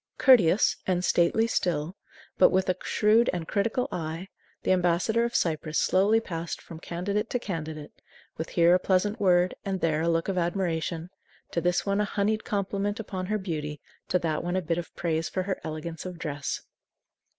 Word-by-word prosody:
Courteous 215 - +5
and 180 -1 +1
stately 175 +7 +3
still, 175 -6 -1 0.4
but - - +8
with 190 0 +1
a 185 - +2
shrewd 220 +2 +3
and 170 -3 -4
critical 225 +5 0
eye, 165 +3 -4 0.3
the - - +1
ambassador 185 +5 +2
of 235 - -4
Cyprus 155 -2 0
slowly 200 +4 +3
passed 170 -6 -5
from 160 - -11
candidate 190 +5 -2
to - - 0
candidate, 160 -8 -5 0.4
with 160 - -5
here 170 0 +4
a 180 - +5
pleasant 200 +4 +1
word 180 -2 +3
and 195 -1 -2
there 160 -3 +1
a 165 - +1
look 165 0 +1
of 190 -2 0
admiration; 170 -1 -2 0.4
to 170 - -1
this 175 +1 +1
one 200 +1 +1
a - - +1
honeyed 210 +2 0
compliment 200 +1 -2
upon 185 -4 -4
her 215 +2 0
beauty, 150 -6 -4 0.3
to - - +2
that 165 -3 -1
one 175 +1 -2
a 185 - +1
bit 165 +1 -1
of 170 - -7
praise 165 -1 -1
for 185 - -2
her 190 0 -3
elegance 160 +1 -5
of 180 -1 -7
dress. 145 -4 -4
180 Hz, 185 wpm, -27 LUFS, 165-200 Hz, 0.4 s, but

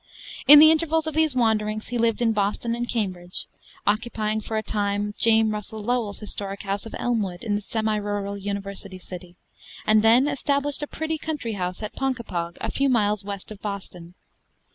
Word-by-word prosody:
In 295 - +12
the 310 +1 +9
intervals 320 0 +1
of 315 - -2
these 315 -3 +2
wanderings 215 -3 +1
he 240 0 -2
lived 230 0 +2
in 225 -1 +3
Boston 210 +3 0
and 240 0 -3
Cambridge; 185 -6 -3 0.4
occupying 215 0 0
for 220 +1 -3
a 215 - -1
time 205 -1 -1
James 225 -1 +4
Russell 210 0 -5
Lowell's 230 -3 0
historic 200 -1 -5
house 200 +2 -3
of - - -8
Elmwood, 210 -7 -1
in 215 -3 -1
the 205 - 0
semi 220 0 -1
rural 205 -1 -3
university 200 -1 -5
city; 180 -1 -10 0.5
and 215 0 +5
then 235 +5 +5
established 280 0 0
a 295 - -3
pretty 320 +1 -3
country 295 -8 -3
house 180 +1 -3
at 210 - -5
Ponkapog, 230 -11 -3
a - - -3
few 275 0 +1
miles 210 -4 +2
west 200 0 -6
of 205 - -10
Boston. 185 -4 -6
215 Hz, 180 wpm, -24 LUFS, 200-240 Hz, 0.5 s, In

